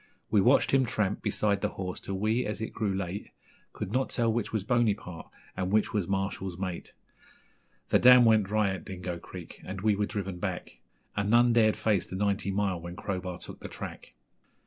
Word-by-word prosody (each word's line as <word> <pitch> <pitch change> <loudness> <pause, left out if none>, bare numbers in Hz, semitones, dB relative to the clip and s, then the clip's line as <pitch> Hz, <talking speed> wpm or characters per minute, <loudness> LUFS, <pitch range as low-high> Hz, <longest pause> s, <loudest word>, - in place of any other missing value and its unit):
We 105 -2 +5
watched 125 +8 +4
him 135 -1 +4
tramp 105 -4 -1
beside 100 -2 0
the - - +1
horse 90 -1 -4
till 95 - -4
we, 110 +5 +1
as 105 -2 -4
it 110 - -4
grew 105 -3 -1
late, 95 +1 -4 0.4
Could - - -5
not 130 +3 0
tell 115 -2 +1
which 120 -2 -2
was 110 -4 -1
Bonypart 105 -7 0 0.3
and 95 0 -2
which 105 0 +2
was 100 -5 0
Marshall's 95 -2 -2
mate. 95 -2 -5 1.0
The - - +4
dam 125 -1 +8
went 110 -3 +5
dry 105 0 +1
at 95 -2 -5
Dingo 90 -3 -5
Creek, - - -10
and 95 0 -6
we 105 0 +3
were 105 0 0
driven 95 -3 -4
back, - - -4 0.4
And 105 -1 0
none 120 +1 +5
dared 110 -2 +4
face 105 -5 +1
the - - -6
Ninety 100 0 0
Mile 95 -3 0
when 85 +1 -7
Crowbar 90 -3 -4
took - - -10
the - - -8
track. - - -8
100 Hz, 195 wpm, -29 LUFS, 95-110 Hz, 1.0 s, dam